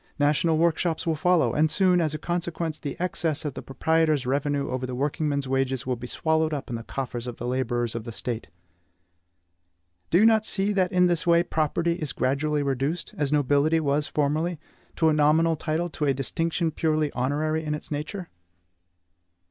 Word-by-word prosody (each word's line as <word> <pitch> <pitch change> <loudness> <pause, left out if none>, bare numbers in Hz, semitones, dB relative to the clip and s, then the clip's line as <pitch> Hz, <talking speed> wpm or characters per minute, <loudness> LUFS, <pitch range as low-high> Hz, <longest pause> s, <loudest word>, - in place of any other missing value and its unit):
National 150 +2 +2
workshops 165 0 +1
will 165 -2 +1
follow; 180 +1 +2
and 155 +1 +3
soon, 180 +1 +3
as 155 -2 0
a - - -2
consequence, 170 -2 -3
the 145 - -5
excess 165 -4 -1
of 145 - -2
the - - -6
proprietor's 155 0 +1
revenue 140 +2 0
over 130 0 -2
the 125 - -4
workingman's 140 +1 -1
wages 135 -1 0
will 130 -1 0
be 125 +1 -8
swallowed 160 +2 0
up 140 -2 -6
in - - -2
the 115 - -4
coffers 120 0 -5
of 120 - -6
the 120 - -6
laborers 120 -2 -1
of 115 -1 -4
the 115 - -7
State. 115 0 -4 1.6
Do 170 - +4
you 210 - +6
not 220 -1 +5
see 205 -1 0
that 185 -2 +1
in 180 -1 +4
this 175 0 0
way 170 0 +5
property 170 +1 0
is 150 -4 -3
gradually 145 +3 0
reduced, 140 +5 -2
as 145 -2 -1
nobility 145 +2 +3
was 145 -1 0
formerly, 155 +3 0 0.4
to 160 - +3
a - - +3
nominal 155 +2 +3
title, 160 +3 -1
to 150 - -2
a 140 -2 +2
distinction 165 +5 -1
purely 155 -1 0
honorary 155 +5 -1
in 150 -1 -2
its 150 - -10
nature? 160 +5 -4
155 Hz, 185 wpm, -26 LUFS, 135-165 Hz, 1.6 s, you